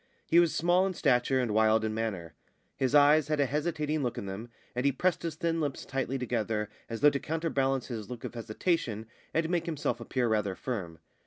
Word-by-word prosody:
He 170 - +5
was 170 -2 +4
small 175 +3 +3
in 190 - -4
stature 125 0 +2
and 120 -4 0
wild 110 0 +4
in 110 - -1
manner. 100 -7 -3 0.4
His 130 +2 +1
eyes 145 +1 +6
had 155 -1 0
a 140 - +4
hesitating 150 +1 -1
look 125 -3 -2
in - - -4
them, 100 +5 -6 0.3
and 125 - -1
he 140 - +4
pressed 180 +7 0
his 165 -2 -3
thin 165 +1 -1
lips 145 -3 -3
tightly 135 0 -2
together, 110 -4 -1 0.2
as 115 -1 -5
though 145 0 +7
to 140 - -1
counterbalance 140 -5 0
his 110 -5 -6
look 125 -2 -7
of - - -5
hesitation 115 - -1 0.3
and 165 0 +1
make 175 0 -1
himself 145 -7 -1
appear 120 +1 -1
rather 105 -4 0
firm. 95 -11 -4
130 Hz, 210 wpm, -30 LUFS, 110-155 Hz, 0.4 s, though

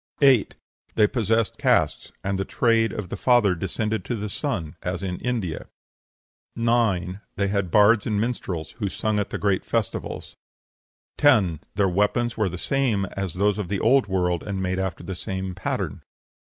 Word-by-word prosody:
8. 135 -6 +4 0.4
They 105 - +5
possessed 115 -1 0
castes; - - +1
and 95 0 -1
the - - +1
trade 115 +1 +2
of 100 -4 -5
the - - -4
father 120 -6 +4
descended 105 +5 -2
to 120 - -2
the 105 -1 -4
son, 100 - -3
as 90 0 -3
in 90 -2 -3
India. 110 -10 -3 0.9
9. 110 -6 +1
They 100 -1 0
had 100 -2 0
bards 105 +3 +5
and 105 -2 0
minstrels, 100 -8 -3
who 100 -3 -1
sung 110 +2 -1
at 105 - -2
the - - -3
great 100 -2 +1
festivals. - - -3 0.8
10. 105 - +4 0.2
Their 100 -1 +3
weapons 105 +6 +1
were 105 -3 +1
the 90 - -6
same 120 -3 0
as 95 -3 -4
those 105 +2 +1
of 100 - -3
the 100 0 -2
Old 130 +2 +4
World, 90 -3 0
and 100 -2 -4
made 95 0 -1
after 95 -3 -3
the 95 - -5
same 95 +1 -4
pattern. - - -3
100 Hz, 170 wpm, -24 LUFS, 95-115 Hz, 0.9 s, They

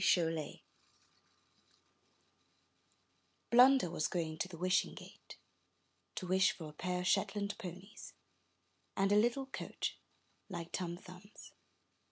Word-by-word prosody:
Chollet 165 -4 +1 2.9
Blunder 255 -2 +7
was 155 -3 0
going 160 -3 -3
to - - 0
the 180 -3 -10
Wishing 185 +3 +1
Gate - - -12 0.8
to 185 - -4
wish 190 +1 +3
for 160 - -8
a - - -13
pair 180 +3 -2
of 180 - -2
Shetland 200 +1 +1
Ponies 185 +3 -9 0.8
and 195 +1 +2
a - - +5
little 240 +5 +3
coach, 265 - -4 0.5
like 170 -3 -6
Tom 175 -2 -3
Thumb's. 180 +3 -13
185 Hz, 115 wpm, -35 LUFS, 170-200 Hz, 2.9 s, Blunder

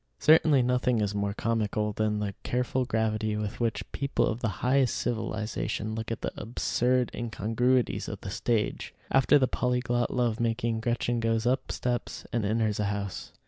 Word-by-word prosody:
Certainly 150 -3 +5
nothing 125 -1 +2
is 105 -1 0
more 100 0 -1
comical 105 -2 0
than 105 0 0
the 105 -1 -2
careful 125 +1 0
gravity 110 -2 0
with 105 +1 -4
which 110 -4 0
people 140 0 0
of 110 - -1
the 115 - 0 0.2
highest 130 -1 +3
civilization 110 -2 -2
look 110 0 -4
at 115 - -4
the - - -2
absurd 125 +2 0
incongruities 120 +2 0
of - - -6
the - - -6
stage. 110 -3 -1 0.2
After 135 +2 +5
the 130 -2 +3
polyglot 125 -1 0
love 120 -2 0
making, 115 0 0
Gretchen 120 +1 0
goes 115 0 0
up 130 +2 0
steps 125 -1 -3
and 115 -2 +1
enters 110 0 0
a 105 - +1
house. 100 -1 -4
115 Hz, 165 wpm, -28 LUFS, 110-125 Hz, 0.2 s, Certainly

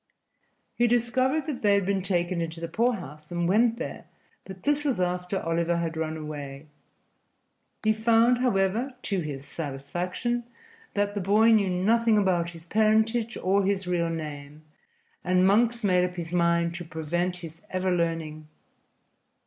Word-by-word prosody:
He 240 - +2
discovered 255 +5 +1
that 295 -6 -4
they 205 -1 +4
had 200 -2 +1
been 195 0 0
taken 175 -2 0
into 165 0 -4
the 165 - -4
poorhouse, 175 - -2
and 175 0 -1
went 230 +5 +3
there, - - -6 0.4
but 190 -1 -10
this 290 0 +2
was 275 -9 0
after 180 +1 -1
Oliver 170 +1 0
had 165 -1 -2
run 160 0 -3
away. 145 -2 -7 1.2
He 215 0 +3
found, 230 +2 +3
however, 235 +2 +1
to 195 -2 -1
his 145 -4 -5
satisfaction, 175 - -3 0.5
that 205 0 0
the 205 - -2
boy 210 +5 +4
knew 210 -4 +4
nothing 220 +5 +2
about 180 -4 +1
his 165 -1 -12
parentage 220 +3 +2
or 195 +2 +2
his 195 0 0
real 175 -2 0
name, 150 -2 -6 0.6
and 185 0 +3
Monks 230 +4 +3
made 180 -3 +3
up 180 0 -2
his 170 -1 -6
mind 170 -1 +2
to 175 0 -6
prevent 170 +3 -2
his 165 +1 -11
ever 185 0 -1
learning. 165 -2 -2
185 Hz, 155 wpm, -26 LUFS, 165-220 Hz, 1.2 s, they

